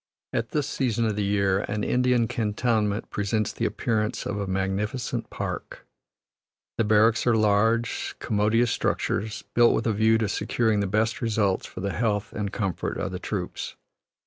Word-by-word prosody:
At 115 -1 -1
this 150 -2 0
season 120 -3 0
of 110 -2 0
the 105 - 0
year, 100 -1 +2
an 105 0 -1
Indian 125 -2 +2
cantonment 105 -1 0
presents 105 +1 -1
the - - -2
appearance 110 0 -1
of 100 - -2
a 100 - -2
magnificent 95 +6 -2
park. - - -5 0.9
The - - +4
barracks 110 +2 +3
are 120 -2 +4
large, 110 +3 +1
commodious 110 +2 +2
structures, 105 +1 -1
built 120 0 +5
with - - -1
a 115 - +2
view 110 +2 +4
to 110 -1 0
securing 110 +1 +1
the 100 - 0
best 110 +4 0
results 105 -5 +1
for - - -8
the 100 0 -2
health 105 -3 -1
and 100 -2 -3
comfort 95 -5 -2
of - - -3
the - - -4
troops. - - -4
110 Hz, 165 wpm, -26 LUFS, 105-115 Hz, 0.9 s, built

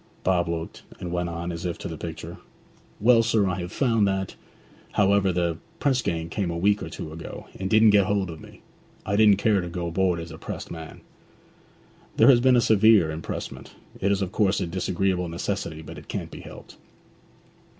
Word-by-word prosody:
Bob 90 -2 +1
looked, 85 -1 -5 0.2
and 90 - -5
went 90 0 -1
on, 85 +1 -4
as 85 0 -6
if 90 -2 -3
to - - -6
the 80 - -5
picture, 80 +1 -7 0.6
'Well, 115 +2 +5
sir, 110 -3 +2
I 95 0 -2
have 90 0 -5
found 115 -5 +2
that 95 -1 -2 0.6
However, 100 -1 +3
the 85 -2 -1 0.2
press 130 -3 +1
gang 80 -5 -2
came 90 +2 -2
a 85 - -3
week 100 +4 +2
or - - -5
two 80 - -7
ago, 80 0 -8
and 95 0 -2
didn't 110 0 +6
get 100 -2 +4
hold 100 -4 0
of 80 - -10
me. - - -14 0.4
I 100 - 0
didn't 105 -2 +6
care 105 -1 +2
to 85 - -5
go 85 0 -4
aboard 90 0 +1
as 85 0 -7
a 80 - -10
pressed - - -7
man.' 80 -1 -9 1.2
'There - - +7
has 125 -3 +7
been 130 +1 +4
a 120 - +5
severe 110 -6 +5
impressment. 80 +1 -6 0.2
It 100 - +1
is 100 0 +1
of 95 - -4
course 100 -2 +2
a 95 - -1
disagreeable 90 +1 -1
necessity, 85 -2 -4
but - - -9
it - - -16
can't - - -5
be - - -9
helped.' - - -12
95 Hz, 200 wpm, -25 LUFS, 85-105 Hz, 1.2 s, There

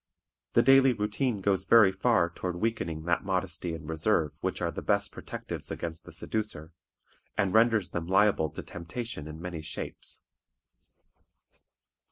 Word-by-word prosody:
The 120 - +5
daily 135 0 +6
routine 105 +1 -1
goes 95 -1 +1
very 105 -2 +7
far 95 -3 +2
toward 90 0 -4
weakening 85 -6 -2
that 85 0 0
modesty 90 -3 -2
and 75 -1 -9
reserve 80 -1 0
which - - -2
are - - -1
the - - -5
best - - +1
protectives - - -6
against 85 -1 -5
the - - -10
seducer, 105 -8 -3 0.7
and 100 -3 +1
renders 110 -5 +4
them 85 -1 -3
liable 95 -4 +3
to - - -8
temptation 90 -1 -6
in 80 +1 -8
many 85 -2 -5
shapes. 80 - -4
95 Hz, 145 wpm, -29 LUFS, 85-110 Hz, 0.7 s, very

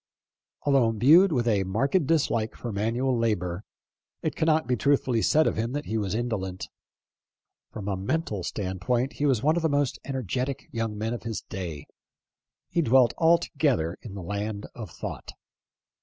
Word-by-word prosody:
Although 135 -5 +4
imbued 150 - +6
with 120 -5 0
a 105 -4 +2
marked 135 - +1
dislike 125 -9 +1
for 120 - -5
manual 120 +6 0
labor, 100 -5 -1 0.6
it - - -1
cannot 160 0 +2
be 125 - +1
truth 140 +4 +2
fully 120 -3 0
said 155 +6 +4
of - - 0
him 115 +3 -1
that 145 +1 -3
he 110 - -3
was 105 -2 -1
indolent. 105 -6 -3 1.0
From 105 -3 -7
a 100 - 0
mental 105 - -2
standpoint 105 +8 -2
he 145 - 0
was 130 -4 +2
one 155 +3 +3
of - - +1
the 160 - +1
most 145 -2 0
ener 135 -2 -3
getic 130 +7 -2
young 115 -2 -3
men 110 +2 -2
of 120 - -5
his 115 -2 -4
day. 85 -6 -6 0.8
He 170 - 0
dwelt 125 -4 +4
altogether 145 - +2
in 100 -4 -9
the 95 - -6
land 105 +2 -3
of - - -8
thought. - - -7
115 Hz, 170 wpm, -27 LUFS, 105-140 Hz, 1.0 s, imbued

